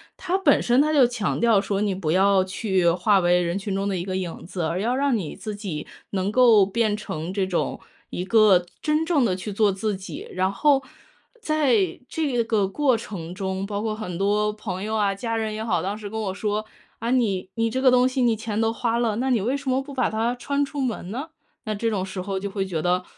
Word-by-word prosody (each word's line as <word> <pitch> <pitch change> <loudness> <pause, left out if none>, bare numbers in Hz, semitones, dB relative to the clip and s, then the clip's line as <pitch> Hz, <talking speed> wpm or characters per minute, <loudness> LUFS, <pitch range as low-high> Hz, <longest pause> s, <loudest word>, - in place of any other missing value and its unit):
它 375 +1 -1
本 320 -8 +4
身， 245 +2 +3
它 305 +1 +1
就 270 -4 +6
强 240 -3 -1
调 230 -4 +5
说 200 0 -1
你 205 -2 +1
不 170 -5 -2
要 195 +1 +4
去 190 -2 +1
化 195 +4 +3
为 175 0 +3
人 175 +2 -1
群 200 -1 -3
中 195 +1 -1
的 190 - -1
一 175 - -4
个 185 -1 -3
影 180 -3 -4
子， 180 0 -5
而 165 +3 -1
要 240 +5 0
让 275 -3 +2
你 165 -7 -5
自 215 -2 -6
己 190 -8 -5 0.3
能 195 +1 -1
够 230 -5 +6
变 215 +1 0
成 170 -3 -5
这 195 -2 0
种 185 -2 -2 0.3
一 180 - -4
个 195 -3 +5 0.2
真 305 +1 +1
正 305 -7 +2
地 185 -5 +1
去 195 +3 -6
做 210 +1 +3
自 205 +1 -2
己 190 - -8
然 185 +1 0
后 275 +5 +3 0.6
在 255 - +1
这 275 -7 0
个 215 -4 +1
过 260 +4 +2
程 180 -6 -6
中， 190 0 -3
包 205 0 -3
括 215 -1 -2
很 180 -6 -5
多 210 +2 +1
朋 195 -3 -5
友 220 +1 -2
啊， 200 -2 +1
家 230 +2 -3
人 220 -1 -2
也 220 - -4
好， 175 -7 +1
当 200 +3 -3
时 210 -1 -7
跟 220 - -4
我 190 -3 -2
说： 210 +1 -2 0.3
“啊， 230 +1 -2
你 200 -7 +1
你 230 0 +1
这 260 - -1
个 260 - +6
东 250 0 +5
西 260 0 -1
你 235 -2 +3
钱 220 0 -3
都 225 0 +2
花 235 0 -1
了， 225 -3 +1
那 260 +3 -1
你 230 - +2
为 250 +7 0
什 280 -1 -11
么 260 +1 +2
不 280 - -10
把 255 -2 +1
它 230 +3 0
穿 280 +3 -1
出 285 0 -5
门 225 -8 -3
呢？” 275 +8 -5 0.4
那 215 - -2
这 225 +3 -1
种 190 -3 -1
时 185 -1 -5
候 195 0 -3
就 200 +1 -4
会 195 -1 -2
觉 165 -4 -3
得， 180 +1 +1
210 Hz, 260 characters per minute, -24 LUFS, 190-240 Hz, 0.6 s, 就